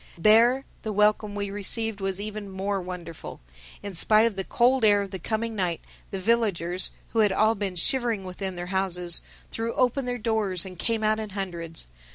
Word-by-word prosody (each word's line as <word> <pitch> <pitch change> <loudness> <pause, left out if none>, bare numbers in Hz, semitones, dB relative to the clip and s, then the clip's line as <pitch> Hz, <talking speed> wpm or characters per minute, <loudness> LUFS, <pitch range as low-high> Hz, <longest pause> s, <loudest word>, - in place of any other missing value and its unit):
There 230 +8 +5 0.2
the 220 - -3
welcome 210 0 +2
we 200 -1 -3
received 205 +1 -2
was 195 0 -2
even 210 -1 -5
more 195 +1 -2
wonderful. 175 -2 -8 0.4
In 200 - -5
spite 215 +5 +4
of 230 -3 0
the 190 - -2
cold 250 +5 +2
air 205 -1 +6
of 195 - -8
the 190 - -5
coming 225 +4 -2
night, 180 -4 0 0.3
the 195 - -4
villagers, 190 -4 +1 0.2
who 225 - -1
had 210 -2 +5
all 215 +3 +3
been 200 -3 -3
shivering 235 +1 +1
within 185 +1 -5
their 175 0 -5
houses, 180 -2 +1 0.3
threw 230 +1 -3
open 255 +1 +1
their 245 0 -2
doors 210 -6 0
and 185 -2 -10
came 225 -2 0
out 215 0 +2
in 215 -1 -4
hundreds. 175 -5 -3
205 Hz, 190 wpm, -26 LUFS, 185-225 Hz, 0.4 s, air